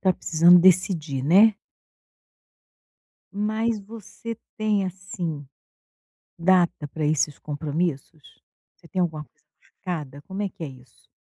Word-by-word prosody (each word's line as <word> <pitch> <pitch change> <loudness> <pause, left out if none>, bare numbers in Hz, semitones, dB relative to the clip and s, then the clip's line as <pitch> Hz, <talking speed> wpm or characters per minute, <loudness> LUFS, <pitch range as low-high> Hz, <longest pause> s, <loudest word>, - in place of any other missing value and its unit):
tá 190 -1 +3
precisando 170 +2 +5
decidir, 170 -6 +2
né. 200 +9 +6 1.8
Mas 220 +2 -1
você 225 +2 -9 0.2
tem, 215 -2 +1
assim, 175 -5 -5 0.9
data 175 -3 +2
para 155 +2 -4
esses 150 -1 0
compromissos? 150 0 -4 0.4
Você - - -20
tem 185 +2 -3
alguma 155 -3 -3
coisa - - -37
marcada? 150 -7 -7
Como 195 +5 -5
é 200 - -1
que 195 -2 -13
é 160 - -3
isso? 125 -3 -17
175 Hz, 120 wpm, -24 LUFS, 150-195 Hz, 1.8 s, né